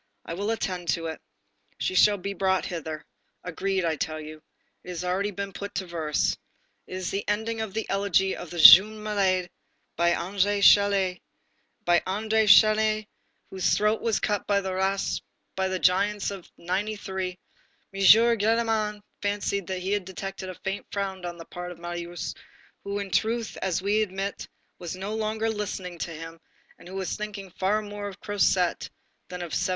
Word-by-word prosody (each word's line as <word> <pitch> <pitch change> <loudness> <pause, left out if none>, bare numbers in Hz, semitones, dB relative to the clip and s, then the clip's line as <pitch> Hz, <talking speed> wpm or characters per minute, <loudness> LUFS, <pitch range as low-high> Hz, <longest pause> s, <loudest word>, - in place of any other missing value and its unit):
I - - -5
will 200 +5 -2
attend 185 -6 -2
to 165 - -6
it. 160 -1 -5 0.6
She - - -1
shall 205 +2 +5
be 200 +1 -4
brought 190 0 +1
hither. 160 -3 -5 0.4
Agreed, 190 +1 -1
I 160 -2 0
tell 155 +1 -3
you. 155 0 -9 0.4
It - - -11
has 180 -1 -4
already 185 +3 0
been 200 -1 -5
put 200 0 -4
into 190 - -6
verse. 160 -4 0 0.5
This 185 0 -5
is - - -2
the 195 - -2
ending 220 +2 -1
of 215 -3 -5
the 220 - -2
elegy 195 -1 +1
of 175 - -8
the 175 - -7
'Jeune 205 +6 +10
Malade' 190 -4 +1 0.4
by 170 +1 +3
André 200 +3 0
Chénier, 200 -2 +4 0.6
by 175 0 +5
André 220 +3 0
Chénier 215 +1 +5 0.5
whose 190 -1 +1
throat 210 +1 +1
was 230 -2 +1
cut 205 -1 -1
by 200 -1 +3
the 190 -1 -3
ras... 190 +1 0 0.3
by 190 0 0
the 185 0 -1
giants 200 +3 +2
of 195 -3 -9
'93." 190 0 -3 0.6
M. 195 - -6
Gillenormand 220 0 +4 0.2
fancied 200 -2 -1
that 185 -1 -4
he 200 +2 +1
detected 190 0 -7
a 185 - -7
faint 195 +1 -4
frown 195 -2 -3
on 175 -1 -5
the 165 - -10
part 180 +1 -7
of 175 - -10
Marius, 175 0 -5 0.5
who, 200 0 -3
in 200 -2 -4
truth, 225 +4 0
as 185 -1 -1
we 205 +2 +2
must - - +4
admit, 195 +2 -4 0.3
was 175 0 -5
no 195 +3 -5
longer 220 0 -1
listening 190 -5 -4
to - - -3
him, 165 +1 -9 0.4
and - - -14
who 185 - -9
was 190 -1 -2
thinking 205 -3 -6
far 205 +5 0
more 205 0 -6
of 195 - -9
Cosette 190 -4 +1 0.4
than 180 0 -6
of 170 -3 -6
1793. 185 +1 0
195 Hz, 175 wpm, -26 LUFS, 180-205 Hz, 0.6 s, Jeune